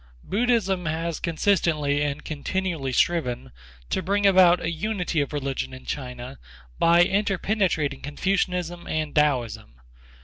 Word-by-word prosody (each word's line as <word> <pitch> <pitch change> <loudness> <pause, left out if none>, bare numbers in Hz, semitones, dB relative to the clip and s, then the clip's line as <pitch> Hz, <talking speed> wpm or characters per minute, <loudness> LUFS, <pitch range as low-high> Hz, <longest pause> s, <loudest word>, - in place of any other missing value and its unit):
Buddhism 200 -5 0
has 165 +1 -2
consistently 155 -4 +1
and 145 0 -2
continually 155 -1 -2
striven 125 - 0 0.4
to - - 0
bring 200 +3 0
about 185 -3 +6
a 165 - -2
unity 180 -2 -1
of 140 - -3
religion 135 -3 -3
in 130 - -13
China 125 -1 -6 0.4
by 170 +1 +6
interpenetrating 190 -7 0
Confucianism 175 +2 -2
and 155 -2 -2
Taoism. 125 - 0
165 Hz, 115 wpm, -25 LUFS, 145-185 Hz, 0.4 s, about